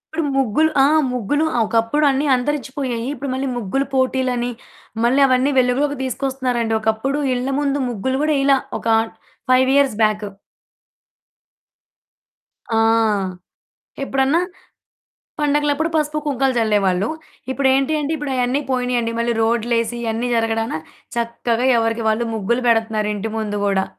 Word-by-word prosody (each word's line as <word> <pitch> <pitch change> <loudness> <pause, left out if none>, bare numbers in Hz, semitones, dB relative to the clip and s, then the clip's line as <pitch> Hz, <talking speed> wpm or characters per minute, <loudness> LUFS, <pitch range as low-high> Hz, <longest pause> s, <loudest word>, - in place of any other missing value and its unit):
ఇప్పుడు 300 -4 -1
ముగ్గులు 270 +6 +2
ఆ! - - +5 0.3
ముగ్గులు 270 +7 0
ఆహ్, - - +3
ఒకప్పుడు 230 +7 +1
అన్ని 275 +2 0
అంతరిచ్చిపోయాయి. 260 -2 -3
ఇప్పుడు 280 0 -5
మళ్ళీ 270 +1 -2
ముగ్గులు 245 +4 -1
పోటీలని, 255 -2 0 0.5
మళ్ళి 260 +4 +3
అవన్నీ 260 +2 +2
వెలుగులోకి 270 +3 +1
దీసుకొస్తున్నారండి. 255 -3 -1
ఒకప్పుడు 220 +6 -1
ఇళ్ళ 250 +2 -2
ముందు 280 0 0
ముగ్గులు 260 +4 -2
గూడా 305 0 +2
యేయలా, 275 -1 +4 0.2
ఒకా 225 -1 +2 0.6
5 260 +1 +4
ఇయర్స్ 275 -6 +3
బ్యాక్. 215 0 +1 2.5
ఆ! 225 - +2 1.3
ఎప్పుడన్నా 270 +4 +1 1.0
పండగలప్పుడు 295 +1 +1
పసుపు, 305 -1 0
కుంకాలు 270 -2 +1
జల్లేవాళ్ళు. 205 -3 +1 0.4
ఇప్పుడేంటి 270 +2 +2
అంటే, 295 +1 -2
ఇప్పుడయన్నీ 265 -2 -1
పోయినియండి. 245 -2 0
మళ్ళీ 235 0 +1
రోడ్లేసి 230 +1 0
ఇయన్నీ 230 +2 -1
జరగడాన, 225 0 0 0.4
చక్కగా 235 +1 -1
ఎవరికి 225 0 -1
వాళ్ళు 225 +2 0
ముగ్గులు 235 +4 -1
బెడతన్నారు 225 -2 +1
ఇంటి 210 +2 -4
ముందు 210 -1 -2
గూడా. 195 -1 +1
250 Hz, 120 wpm, -20 LUFS, 225-275 Hz, 2.5 s, ఆ